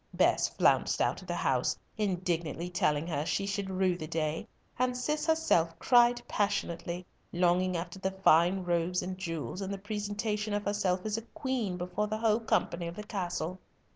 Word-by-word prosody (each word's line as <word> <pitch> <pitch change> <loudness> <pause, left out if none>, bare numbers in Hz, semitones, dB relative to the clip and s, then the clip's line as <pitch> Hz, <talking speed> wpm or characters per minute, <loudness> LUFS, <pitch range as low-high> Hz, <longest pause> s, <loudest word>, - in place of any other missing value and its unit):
Bess - - +4
flounced - - +3
out - - +1
of - - -13
the - - -2
house, - - +1 0.2
indignantly 175 -4 -1
telling 150 -3 +1
her 150 -4 -1
she 195 +4 -1
should 200 -1 -2
rue 185 -1 +1
the 155 -3 -6
day, 155 -1 -2 0.3
and 250 0 +1
Cis 300 +4 -1
herself 175 - +2
cried 240 +5 +5
passionately, 180 -3 -1 0.3
longing 180 +1 +2
after 175 +2 -5
the 190 - 0
fine 185 0 +4
robes 175 +1 0
and 185 +1 -4
jewels, 175 0 -4
and 195 0 -3
the 200 - -3
presentation 210 +1 -2
of 205 - -2
herself 190 -2 0
as 215 0 -1
a - - -3
queen 260 - -1
before 180 +4 -2
the 215 +1 -2
whole 220 0 +2
company 170 -6 0
of 170 - -6
the 210 - -6
castle. 185 -4 -3
190 Hz, 175 wpm, -31 LUFS, 175-210 Hz, 0.3 s, cried